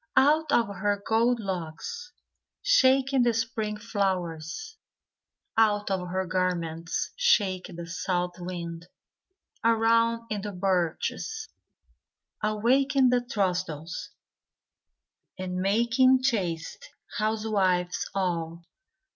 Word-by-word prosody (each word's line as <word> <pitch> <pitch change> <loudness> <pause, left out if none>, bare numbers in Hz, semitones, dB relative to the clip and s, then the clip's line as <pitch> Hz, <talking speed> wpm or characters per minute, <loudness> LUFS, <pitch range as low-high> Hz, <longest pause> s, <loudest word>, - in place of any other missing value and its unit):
Out 300 +4 +4
of 235 - +4
her 205 0 0
gold 230 +2 +3
locks 190 - -5 0.5
Shaking 270 - +4
the 240 -2 +3
spring 220 -2 -2
flowers, 195 - -3 0.8
Out 210 -2 +3
of 185 -2 -1
her 190 +1 -1
garments 170 -2 -1
Shaking 195 - +2
the 170 0 -6
south 175 +1 -2
wind, 170 -1 -6 0.8
Around 230 0 +3
in 210 -2 -1
the 205 0 -5
birches, 190 - -1 0.9
Awaking 255 +6 +3
the 250 -1 +3
throstles, 180 - -2 1.3
And 185 -1 -4
making 235 +7 +3
chaste 195 - -2 0.3
housewives 205 -5 0
all. 170 -3 -2
205 Hz, 90 wpm, -27 LUFS, 180-235 Hz, 1.3 s, Out